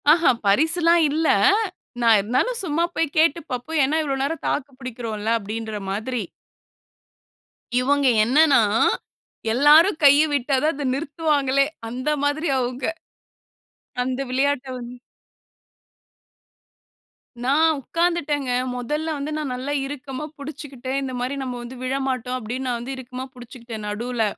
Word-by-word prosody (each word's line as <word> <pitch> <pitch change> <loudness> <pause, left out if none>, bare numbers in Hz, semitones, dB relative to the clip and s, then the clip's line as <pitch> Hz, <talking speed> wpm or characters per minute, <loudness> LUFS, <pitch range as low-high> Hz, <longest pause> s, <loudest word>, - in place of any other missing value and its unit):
ஆஹூம். 305 -7 +4
பரிசுலாம் 330 - +4
இல்ல. 315 +2 0 0.7
நான் 230 -2 +6
இருந்தாலும் 255 - 0
சும்மா 330 -1 0
போய் 320 -3 -1
கேட்டு 320 0 +4
பாப்போம். 255 +6 -2
ஏன்னா, 300 +4 0
இவ்ளோ 275 -2 -1
நேரம் 320 +4 -3
தாக்கு 285 -1 -2
பிடிக்கிறோம்ல, 225 -4 -4
அப்பிடீன்ற 215 +1 -5
மாதிரி. 225 +3 -2 1.6
இவங்க 280 +2 +2 0.2
என்னன்னா, 285 +5 +5 0.9
எல்லாரும் 305 - +6
கைய 285 +1 +7
விட்டா 275 0 +1
தான், 315 +2 +2
அதை 285 0 -4
நிறுத்துவாங்களே, 280 -2 +1 0.2
அந்த 255 +5 -3 0.2
மாதிரி 300 +3 0
அவங்க. 250 +1 -3 1.2
அந்த 255 +1 -2
விளையாட்ட 270 +1 0
வந்து 240 0 -8 2.5
நான் 310 +5 +3
உட்கார்ந்துட்டேங்க. 295 -3 -1 0.3
முதல்ல 300 +6 -2
வந்து, 285 +2 -4
நான் 300 -4 -3
நல்லா 265 +3 -3
இறுக்கமா 275 0 -6
புடிச்சுக்கிட்டேன். 275 -3 -6
இந்த 265 -1 -4
மாரி, 255 +3 -2
நம்ம 250 -2 -4
வந்து 240 +2 -9
விழமாட்டோம், 255 -1 -2
அப்பிடீன்னு, 255 +3 -4
நான் 240 -2 -1
வந்து 250 +3 -5
இறுக்கமா 255 0 -7
புடிச்சுக்கிட்டேன், 235 -3 -9
நடுல. 235 +2 -2
270 Hz, 120 wpm, -23 LUFS, 245-300 Hz, 2.5 s, கைய